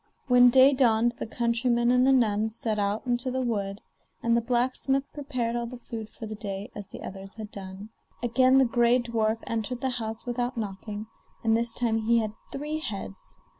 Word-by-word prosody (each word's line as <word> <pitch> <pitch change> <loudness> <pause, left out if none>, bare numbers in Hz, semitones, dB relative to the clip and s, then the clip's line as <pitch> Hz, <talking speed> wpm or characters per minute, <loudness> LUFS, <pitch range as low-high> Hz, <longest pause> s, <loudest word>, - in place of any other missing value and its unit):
When 250 -1 +7
day 265 +3 +7
dawned 240 -3 +3
the - - -3
countryman 235 +1 +1
and 250 +1 +4
the - - +6
nun 220 -4 +3
set 220 -1 -2
out 205 +3 -1
into 245 +1 0
the 260 0 -1
wood, 200 -4 -2 0.4
and 235 0 +3
the 235 - +3
blacksmith 255 +3 +1
prepared 255 -5 -2
all 235 0 -2
the 250 +1 -8
food 225 -2 -7
for 225 - -9
the 215 - -6
day 200 -2 -6
as 205 -2 -7
the - - -10
others 195 0 -8
had 215 -2 -8
done. 195 +1 -8 0.3
Again 255 +2 +4
the 265 - +6
gray 240 0 +3
dwarf 230 -2 0
entered 230 +2 -3
the 265 - 0
house 220 0 -4
without 245 0 -2
knocking, 205 0 -5 0.4
and 225 -1 +3
this 235 +1 0
time 230 -1 0
he 230 +2 +3
had 215 -2 0 0.2
three 300 +3 -3
heads. 200 - -7
235 Hz, 195 wpm, -27 LUFS, 215-250 Hz, 0.4 s, When